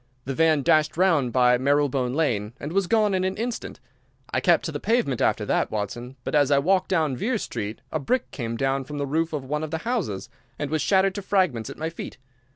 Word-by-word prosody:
The 135 - -2
van 155 -1 +3
dashed 155 +3 +3
round 165 -9 +3
by 125 -1 +4
Marylebone 140 -2 +1
Lane 115 -9 0
and 145 - -5
was 195 -1 +1
gone 215 -2 +3
in 185 -1 +1
an 190 +1 -1
instant. 235 +2 -4 0.5
I - - +2
kept - - +3
to - - -2
the - - -4
pavement 225 - 0
after - - +1
that, - - +1
Watson, 120 +5 -4
but - - -4
as 145 -2 +4
I 140 - +4
walked 185 +6 +2
down 155 -7 +1
Vere 230 - -1
Street 110 - -5
a 155 - -1
brick 250 - -1
came 115 -3 -4
down 135 +1 0
from 145 +2 -7
the 140 - -1
roof 160 +4 0
of 145 -4 -4
one 150 +3 -2
of 155 - -4
the 160 - -2
houses, 205 - -2 0.3
and 145 0 -4
was 155 -1 0
shattered 190 +4 +3
to 200 - -5
fragments 185 - +1
at - - -8
my 160 +1 -3
feet. - - -8
150 Hz, 230 wpm, -25 LUFS, 130-185 Hz, 0.5 s, by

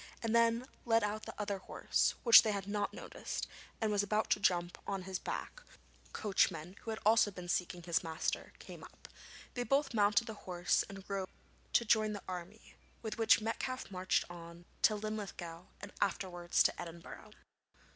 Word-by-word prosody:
He 225 - 0
then 230 +1 +3 0.2
led 225 -1 +3
out 210 +1 -2
the - - -8
other 200 -2 -2
horse, - - 0
which 235 -2 +10
they 220 - 0
had 200 -1 -4
not 205 0 -1
noticed, - - -5 0.3
and 220 -2 +1
was 205 -1 +3
about 210 +2 0
to - - +4
jump 175 -3 +1
on 195 -2 -2
his 185 -1 -4
back - - -5
when - - -23
Thornton's - - -25
coachman, 185 -4 0
who - - -7
had 220 - -2
also 220 -1 +6
been 180 -3 -8
seeking 175 0 -1
his 170 0 +1
master, 160 -1 -2
came - - -11
up. - - -13 0.5
They 245 - -2
both 275 +1 +1
mounted 210 +1 +4
the 225 - -5
horse 180 -3 0
and 195 -1 -10
rode 195 -1 -3 0.4
to 235 - +4
join 215 -1 +3
the 205 - -6
army, 185 +4 -7 0.3
with 220 +1 -4
which 225 0 +6
Metcalfe 255 +2 -3
marched 185 0 +1
on 170 0 -10 0.2
to 215 - +5
Linlithgow 200 -5 -5 0.2
and 200 +1 -8
afterwards 175 -3 +1
to - - +1
Edinburgh. 170 0 -9
205 Hz, 180 wpm, -34 LUFS, 180-220 Hz, 0.5 s, which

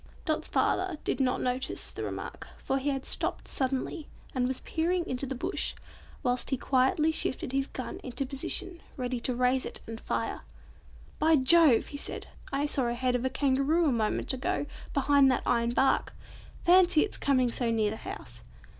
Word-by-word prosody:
Dot's 310 -3 -1
father 370 -3 0
did - - -1
not 255 -1 +1
notice 255 +1 -2
the - - -6
remark, - - -6
for 270 - -1
he 280 +2 -1
had 270 -1 -2
stopped - - -1
suddenly, 270 +4 -2 0.3
and 250 -1 +1
was 260 0 -2
peering 345 +2 -1
into 255 +2 -3
the 265 - -3
bush 250 - -1 0.5
whilst 245 0 +1
he 265 - 0
quietly 275 +6 +2
shifted 260 -5 -1
his 270 0 0
gun 255 - -6
into 265 +2 -2
position, 335 +6 -1 0.2
ready 250 -1 -2
to 250 +1 -1
raise 250 +1 +2
it - - -4
and 225 0 -7
fire. - - -2 0.8
"By 320 +1 +5
Jove!" 290 -2 +5
he 285 - -6
said, - - -4 0.3
"I 280 +1 0
saw 280 -3 0
the 235 0 -1
head 250 +1 0
of 245 +1 -1
a - - +2
Kangaroo 280 +5 +2
a - - +2
moment 225 +2 +2
ago 260 +2 -1 0.3
behind 280 -1 +4
that 255 - 0
iron 235 -1 +2
bark. 265 +3 +1 0.5
Fancy 355 -2 +6
it's 425 - +1
coming 255 -3 +2
so 240 0 -1
near 220 -2 +1
the 220 - -5
house. 390 - -7
265 Hz, 180 wpm, -29 LUFS, 250-300 Hz, 0.8 s, Fancy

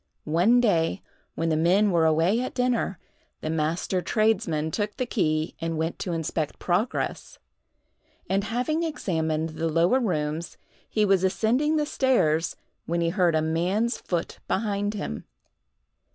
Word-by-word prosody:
One 180 +10 +4
day, 195 -5 +1 0.3
when 165 0 -1
the 160 - +2
men 185 +6 +3
were 165 -2 +3
away 165 +9 +2
at 255 - -4
dinner, 250 -6 0 0.4
the 155 - -2
master 165 +4 -1
tradesman 175 -6 +1
took 210 +2 -2
the 255 - 0
key 155 -9 0
and 165 -1 -2
went 160 +1 -2
to 180 - -3
inspect 160 -2 -2
progress, 190 +7 -2 0.9
and, 195 +1 0
having 250 +9 -1
examined 160 - -1
the 160 +1 -2
lower 170 +10 +3
rooms, 160 - -2 0.3
he 215 -1 +2
was 195 -2 +3
ascending 230 +11 +2
the 300 -1 +1
stairs, 175 - +1 0.3
when 170 +1 0
he 170 0 +1
heard 175 -2 +2
a 155 - +2
man's 180 +9 0
foot 170 -2 -3
behind 205 -1 -1
him. 135 - -5
180 Hz, 145 wpm, -26 LUFS, 160-220 Hz, 0.9 s, One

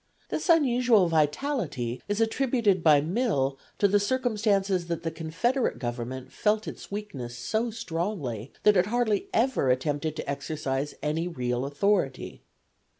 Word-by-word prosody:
This - - -3
unusual 245 - +4
vitality 150 - 0
is 205 +1 -1
attributed 225 -4 +2
by 150 -3 +6
Mill 155 - 0 0.2
to 200 - +4
the 205 +1 +3
circumstance 210 -3 +1 0.2
that 170 0 -4
the 165 - -2
confederate 165 - -1
government 120 +1 -5
felt 215 0 +1
its - - -8
weakness 140 - -6
so 220 - -1
strongly 165 - -4
that 210 -1 +6
it 180 +2 +3
hardly 220 -3 0
ever 235 - +2
attempted 145 +4 0
to - - -6
exercise 140 -1 -3
any 155 +3 -1
real 125 -6 -2
authority. 145 -2 0
175 Hz, 135 wpm, -27 LUFS, 140-220 Hz, 0.2 s, by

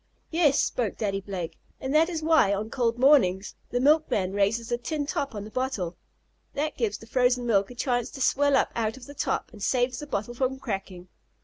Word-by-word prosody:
"Yes," 320 -4 +3
spoke 230 -6 -1
Daddy 195 -2 -1
Blake. 190 -4 -6 0.2
"That 305 +6 +2
is 325 -3 -3
why, 315 -11 +4
on 215 +3 -4
cold 235 -2 0
mornings, 245 -8 +4 0.2
the 245 - 0
milkman 270 -9 +2
raises 205 +3 +1
the 240 0 -1
tin 295 +3 -3
top 280 -4 -3
on 205 - -4
the 215 - -10
bottle. 255 -10 -2 0.6
That 300 +2 -1
gives 215 -4 -1
the 225 - -13
frozen 245 +1 +2
milk 200 -4 +2
a 245 - -10
chance 245 -1 0
to 275 - -7
swell 285 +2 +3
up - - +1
out 225 +1 -1
of 255 - -11
the 285 - -10
top, - - -2
and 210 - -12
saves 245 +3 +1
the 295 - -7
bottle 215 -2 -3
from 260 +2 -1
cracking." 195 -7 -5
245 Hz, 205 wpm, -26 LUFS, 205-275 Hz, 0.6 s, why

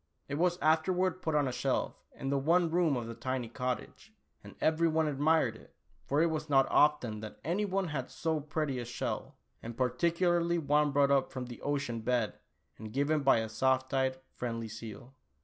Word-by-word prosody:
It 145 +1 -3
was 175 0 +2
afterward 180 +4 +2
put 160 -3 -1
on 145 -2 +3
a - - -1
shelf - - -1 0.2
in 135 - -3
the 140 - +2
one 165 +4 +3
room 165 -5 +2
of 120 - -3
the 115 - -6
tiny 130 0 -3
cottage, 125 - -5 0.3
and - - -12
every 160 +1 +2
one 160 -1 +2
admired 145 -4 +2
it, - - -17 0.3
for 145 +4 +3
it 170 - +2
was 155 -1 -3
not 135 -2 +5
often 125 -8 +3
that 110 0 -9
any 180 +7 0
one 195 -2 -1
had 135 -5 -3
so 160 -2 -1
pretty 150 -2 -2
a 120 - -4
shell, 120 - -4 0.3
and 115 0 -8
particularly 170 +6 +1
one 150 -1 +2
brought 140 0 +3
up 135 -1 +2
from 130 -1 -5
the 120 -1 -10
ocean 140 -5 -2
bed 120 -2 0 0.4
and 110 0 -8
given 145 +3 +1
by 135 -5 +4
a 110 - -3
soft 130 +4 +1
eyed, 130 -1 +1 0.2
friendly 115 -2 -4
seal. 115 +3 -9
140 Hz, 195 wpm, -31 LUFS, 125-160 Hz, 0.4 s, not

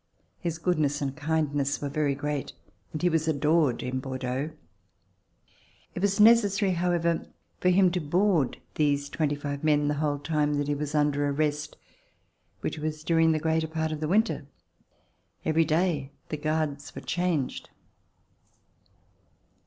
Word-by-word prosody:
His 170 -3 -3
goodness 155 -5 +1
and 135 -1 -2
kindness 145 -2 0
were 145 - -3
very 140 0 0
great 145 0 -3 0.4
and 155 - -5
he - - +5
was 160 -2 +1
adored 150 -3 +2
in 125 +1 -2
Bordeaux. 130 +2 -3 1.4
It - - -5
was 200 0 +1
necessary, 210 -3 +5
however, 170 -1 0 0.3
for 180 - +3
him 185 0 +5
to 180 - 0
board 170 -2 +1 0.2
these 145 -1 +1
twenty 150 -3 0
five 145 0 -5
men 150 -1 +3
the - - +1
whole 145 -2 +1
time 150 0 0
that 145 0 -1
he 145 - +1
was 145 +1 -3
under 145 -1 +2
arrest, 150 +1 -1 0.8
which - - -3
was 155 0 -4
during 165 0 +3
the 160 - +2
greater 160 +1 0
part 160 0 -2
of 155 - -3
the 155 - -2
winter. 200 -5 +1 1.0
Every 160 +1 +3
day 155 -3 +1 0.2
the 155 - -3
guards 150 -1 -2
were - - -6
changed. 175 -7 -1
155 Hz, 145 wpm, -27 LUFS, 145-165 Hz, 1.4 s, he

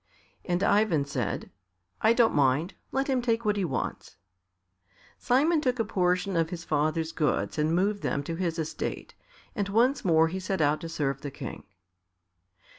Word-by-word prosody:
And 180 +1 -1
Ivan 200 -9 +3
said, 130 -7 -3 0.5
"I 220 - +5
don't 235 -1 +3
mind; 145 +5 +2 0.2
let 270 +1 0
him 260 -3 +1
take 235 -1 0
what 210 -1 +2
he 200 - 0
wants." 145 -8 -4 1.0
Simon 300 +6 +3
took 255 -3 0
a 225 - 0
portion 180 -1 0
of 165 -1 +1
his 170 -2 -6
father's 155 +1 0
goods 150 -1 -1
and 155 +2 +2
moved 200 +3 +1
them 140 - -1
to 165 - -4
his 170 -1 -2
estate, 160 -1 -4 0.4
and 200 -4 -1
once 245 +7 +2
more 160 -3 +4
he 190 +3 -4
set 190 0 -2
out 150 0 +2
to 165 - -6
serve 140 -4 -2
the 145 - -4
King. 140 - -8
180 Hz, 170 wpm, -28 LUFS, 155-215 Hz, 1.0 s, I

